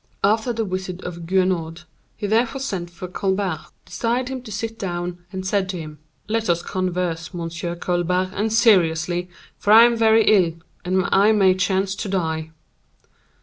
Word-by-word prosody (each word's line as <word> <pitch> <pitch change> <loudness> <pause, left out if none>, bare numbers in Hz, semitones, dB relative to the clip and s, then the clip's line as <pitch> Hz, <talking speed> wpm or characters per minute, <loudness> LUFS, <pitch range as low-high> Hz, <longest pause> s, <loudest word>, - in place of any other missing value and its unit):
After 220 +4 +2
the 225 -1 -2
visit 185 -1 -5
of 170 -1 -7
Guenaud, 175 -3 0 0.3
he - - -4
therefore 230 +5 +1
sent 190 -10 -3
for 175 +1 -8
Colbert, 190 -3 -2 0.2
desired 245 +2 -1
him 260 -1 -5
to 235 -3 -11
sit 225 +3 -4
down, 175 -1 -4
and 190 -1 -5
said 190 0 0
to 185 - -3
him: 155 -2 -9 0.3
"Let 225 -1 -1
us 170 0 +1
converse, 180 -1 -2
Monsieur 170 0 -4
Colbert, 180 +1 0
and 215 +2 -1
seriously, 180 -5 +3 0.3
for 205 - +1
I 225 +2 +10
am 240 0 +4
very 225 -1 +4
ill, 185 -6 +4 0.3
and 185 +1 +1
I 205 +3 +5
may 195 -3 +5
chance 190 +1 0
to 205 - -4
die." 160 -4 -2
185 Hz, 165 wpm, -22 LUFS, 175-215 Hz, 0.3 s, I